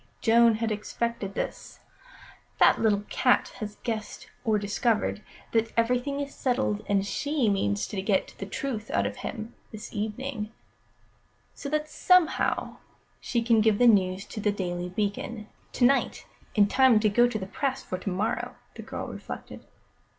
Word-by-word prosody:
Joan 230 0 +5
had 225 0 -1
expected 215 -1 -3
this. - - -5 0.8
"That - - +5
little 205 -2 +2
cat 250 - +2
has 210 -2 -5
guessed 220 -3 -5
or 220 -2 +2
discovered 210 +1 0 0.3
that 225 0 +1
everything 250 +4 +1
is 280 -1 -4
settled, 105 - 0
and 200 -1 +2
she 285 +3 0
means 100 - 0
to 195 - -4
get 195 -1 0
the 195 - -5
truth 220 0 -4
out 100 - +1
of 100 0 -3
him 220 +1 -6 0.2
this 215 0 -9
evening, 215 +1 -4 1.0
so 280 - -6
that 305 +1 0
somehow 365 +2 +2 0.4
she 235 -1 -1
can 230 -1 +4
give 215 -1 +3
the 245 - +4
news 195 -3 +4
to - - -7
The 210 0 +1
Daily 180 -3 -3
Beacon 210 +3 -3 0.3
to 245 - +3
night, 270 +2 +2 0.3
in 205 -2 +6
time 255 +1 +5
to 215 - +2
go 240 +4 +4
to 230 -3 -3
press 270 +6 -2
for 185 - -4
to 195 - -3
morrow," 195 +4 -2 0.2
the - - -8
girl - - -5
reflected. - - -8
220 Hz, 160 wpm, -27 LUFS, 205-245 Hz, 1.0 s, in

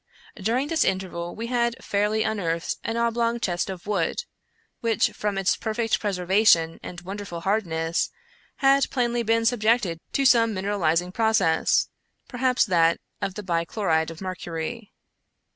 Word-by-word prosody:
During 235 +7 0
this 320 +1 +2
interval 180 -2 -2
we 230 - -5
had 235 -1 0
fairly 210 +2 0
unearthed 170 -7 -2
an 225 0 -2
oblong 235 0 +1
chest 175 -6 -1
of 185 -2 -7
wood, 200 - -1 0.6
which, 230 -4 +1
from 205 -2 -3
its 195 -1 +2
perfect 225 0 -1
preservation 185 -4 +3
and 175 - -8
wonderful 190 -2 -6
hardness, 170 -5 0 0.5
had 275 -1 +3
plainly 240 -2 0
been 230 0 +1
subjected 225 -7 +2
to 275 - +1
some 230 -4 +5
mineralizing 180 -3 0
process 220 -8 +2 0.2
— - - -47
per 245 - -8
haps 255 -1 +3
that 170 -5 +3 0.2
of 190 - -2
the 210 - -6
bichloride 165 -1 0
of 165 +1 -10
mercury. 185 +3 -5
205 Hz, 145 wpm, -25 LUFS, 175-230 Hz, 0.6 s, some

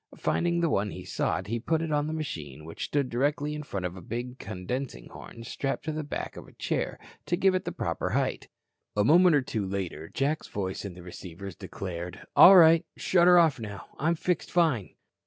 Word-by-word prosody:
Finding 170 0 +1
the 170 - +2
one 100 -3 +1
he - - -8
sought, 95 - -1
he 115 +5 -2
put 160 +7 0
it 165 -1 -3
on 150 0 +1
the - - -3
machine 75 - -5
which 80 - -5
stood 140 -2 0
directly 145 +4 0
in 150 - -4
front 100 -11 -4
of 90 0 -4
a 95 - -9
big 120 +6 -5
condensing 115 +7 -5
horn 115 - -11
strapped 135 +3 -3
to 160 - -1
the 155 0 -3
back 145 - -5
of - - -10
a - - -17
chair - - -2 0.3
to 175 - +1
give 190 0 +4
it 185 0 -1
the - - -2
proper - - -2
height. - - -1 0.5
A 105 - +4
moment 170 - +6
or 140 - +3
two 110 -4 -2
later, 95 -5 -4
Jack's 145 +4 -1
voice 95 0 -4
in 95 -3 -6
the 90 - -11
receivers 90 +1 -9
declared: 90 -2 -7
"All 195 - +10
right. 165 -1 +7
Shut 175 -1 +3
her 180 0 +8
off 160 -6 +4
now. 105 -3 -8
I'm 165 +4 +2
fixed 180 +2 -1
fine." 155 - +1
130 Hz, 210 wpm, -28 LUFS, 95-160 Hz, 0.5 s, All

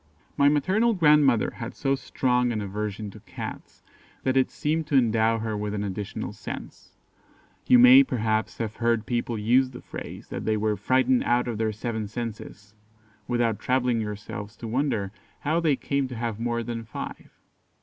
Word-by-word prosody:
My 140 0 +5
maternal 195 +11 +2
grandmother 150 - +4
had 115 +1 -6
so 135 0 0
strong 125 -2 0
an 110 - -2
aversion 105 +1 -4
to - - -12
Cats - - -9 0.4
that 130 0 +1
it 130 -1 +3
seemed 155 +1 -1
to 150 - 0
endow 115 -2 +3
her 110 -1 -3
with 105 0 -3
an 100 - -2
additional 100 0 -4
sense. - - -9 0.7
You 255 - +7
may, 250 +2 +9
perhaps, 110 - -1
have 110 -2 -4
heard 115 -2 +1
people 120 -1 -2
use 125 +5 +3
the 125 -1 -10
phrase, - - -8
that - - -5
they 110 -1 +1
were 105 0 0
"frightened 130 +5 +2
out 120 +1 +1
of 115 -3 -3
their 110 -1 +1
seven 110 0 -4
senses," 110 -2 -7 0.5
without 120 -3 0
troubling 125 -2 +1
yourselves 105 0 -6
to 115 - -7
wonder 110 -5 -1 0.3
how 155 +3 +1
they 160 -4 +2
came 140 0 -1
to 125 - -7
have 115 -2 -3
more 120 0 -1
than 115 0 -4
five. 110 - -7
120 Hz, 170 wpm, -26 LUFS, 110-130 Hz, 0.7 s, may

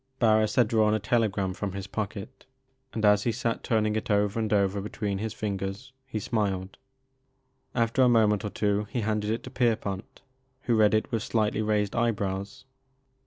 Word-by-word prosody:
Barris 110 -3 +3
had 120 -3 +4
drawn 110 -2 +3
a - - 0
telegram 105 -3 0
from 100 0 -4
his 100 -1 -5
pocket, 110 +4 -6 0.4
and 110 -1 -1
as 105 0 +5
he 120 - 0
sat 115 0 -2
turning 110 -2 +1
it 110 - -3
over 105 +1 +2
and 110 -2 -1
over 100 -1 +2
between 100 -1 -3
his 110 +1 -3
fingers 100 +5 -4
he 120 - -4
smiled. 100 -3 -2 1.0
After 115 +1 +2
a 125 - +6
moment 110 -3 +3
or 105 - -2
two 105 0 0
he 125 - -2
handed 105 -1 -1
it 115 +1 -2
to 130 - -9
Pierpont 110 -6 -2 0.4
who 120 - 0
read 110 -1 +4
it 110 - -1
with 115 -3 0
slightly 110 -2 0
raised 105 -2 0
eyebrows. 100 -4 -2
105 Hz, 175 wpm, -27 LUFS, 100-115 Hz, 1.0 s, a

